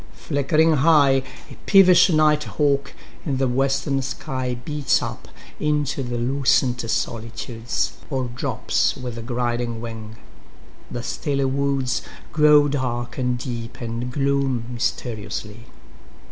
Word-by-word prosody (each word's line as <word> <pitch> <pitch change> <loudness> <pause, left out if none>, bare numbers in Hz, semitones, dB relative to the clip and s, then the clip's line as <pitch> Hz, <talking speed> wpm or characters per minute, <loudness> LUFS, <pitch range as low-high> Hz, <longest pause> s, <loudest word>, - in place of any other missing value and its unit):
Flickering 155 +2 +2
high,5A 135 -3 +2
peevish 190 -2 +7
night 155 -2 +3
hawk 140 -2 0 0.3
in 140 -5 -1
the 135 0 +1
western 135 +2 +1
sky6Beats 130 0 -2
up - - -6 0.3
into 150 -2 0
the 120 -2 -3
lucent 125 0 +2
solitudes,7Or 120 +3 -3
drops 125 - 0
with 120 -2 -6
griding 120 -1 -2
wing. 110 -1 -7 0.7
The 120 - -5
stilly 140 +2 -2
woods8Grow 140 +2 +2
dark 125 -3 -3
and 125 -1 0
deep, 120 -2 -6
and 120 +1 -4
gloom 135 -3 0
mysteriously. 115 -2 -4
130 Hz, 100 wpm, -22 LUFS, 120-140 Hz, 0.7 s, peevish